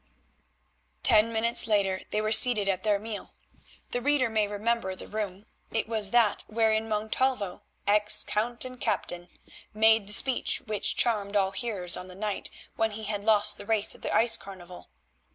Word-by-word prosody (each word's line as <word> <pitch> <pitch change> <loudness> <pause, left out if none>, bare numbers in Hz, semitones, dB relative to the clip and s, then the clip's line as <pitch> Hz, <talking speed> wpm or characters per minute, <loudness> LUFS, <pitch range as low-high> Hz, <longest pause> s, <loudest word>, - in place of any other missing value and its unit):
Ten 220 +1 +5
minutes 230 +1 +3
later 195 -3 0
they 210 - -2
were 215 0 -3
seated 220 -2 +5
at 190 -2 -1
their 210 -1 0
meal. 210 0 -8 0.6
The 245 - -3
reader 270 -3 0
may 215 -2 0
remember 205 -1 -3
the - - -12
room; 205 -2 -6 0.2
it 225 - -3
was 220 -3 +3
that 230 -2 +1
wherein 220 0 -1
Montalvo, 215 -1 -2 0.2
ex 210 +1 +4
count 235 +4 -2
and 255 -1 -10
captain, 175 -5 -2 0.5
made 220 -1 +3
the 205 - -1
speech 260 +3 +2
which 215 -3 -2
charmed 210 -3 0
all 195 -1 +1
hearers 195 -4 -1
on 180 - -8
the 180 - -10
night 205 0 -4 0.3
when 225 0 0
he 220 +1 -7
had 205 -1 -4
lost 210 -1 +3
the 205 - -9
race 220 -2 0
at - - -16
the - - -5
ice 230 0 +5
carnival. 185 -2 -12
215 Hz, 170 wpm, -26 LUFS, 200-225 Hz, 0.6 s, Ten